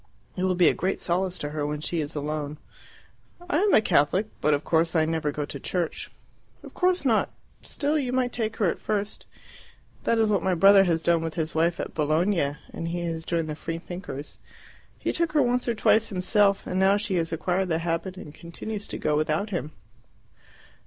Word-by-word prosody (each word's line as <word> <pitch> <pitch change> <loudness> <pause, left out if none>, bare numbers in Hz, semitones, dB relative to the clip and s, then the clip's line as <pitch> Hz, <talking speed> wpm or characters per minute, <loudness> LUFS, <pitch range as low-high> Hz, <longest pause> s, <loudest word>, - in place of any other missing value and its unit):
It 180 - -4
will 185 -1 +1
be 175 -2 +5
a - - +5
great 190 +2 -1
solace 180 +1 -1
to 145 - -4
her 150 -1 -3
when 150 0 -2
she 160 +2 -2
is 150 +1 -4
alone." 150 0 -3 0.9
"I 340 -3 +1
am 410 +1 +3
a - - +6
Catholic, 180 +2 +2 0.2
but 150 - +3
of 145 - -4
course 165 +1 +1
I 160 -1 +4
never 160 -2 -1
go 145 0 -3
to 145 -1 -8
church." 175 +3 -3 0.5
"Of - - -11
course 365 -4 +1
not. 225 -4 +3 0.3
Still, 300 +2 -1
you 255 -3 -2
might 255 -1 0
take 225 -2 -2
her 210 - +1
at 170 - 0
first. 205 -1 -3 0.8
That 230 - +2
is 220 -1 +3
what 205 -2 +2
my 185 -1 +1
brother 195 +2 +7
has 165 -2 0
done 170 -1 +3
with 165 -1 -4
his 160 -1 -2
wife 170 +2 +1
at - - -4
Bologna 155 -1 +1 0.2
and 165 - -4
he 175 +1 -3
has 165 -1 -3
joined 165 -1 -1
the 155 - -4
Free 165 +2 -4
Thinkers. 175 -4 -7 0.6
He - - -2
took 335 -2 0
her 300 - +4
once 250 0 0
or 235 - +1
twice 220 +1 +3
himself, 200 +1 +2
and 185 - -2
now 195 +1 +4
she 205 -3 -1
has 165 -1 -1
acquired 180 +3 0
the 160 -2 +1
habit 170 +3 -3
and 150 -5 -9
continues 200 +6 -7
to - - -5
go 150 - 0
without 155 +7 0
him." 160 -5 -3
175 Hz, 210 wpm, -26 LUFS, 160-205 Hz, 0.9 s, brother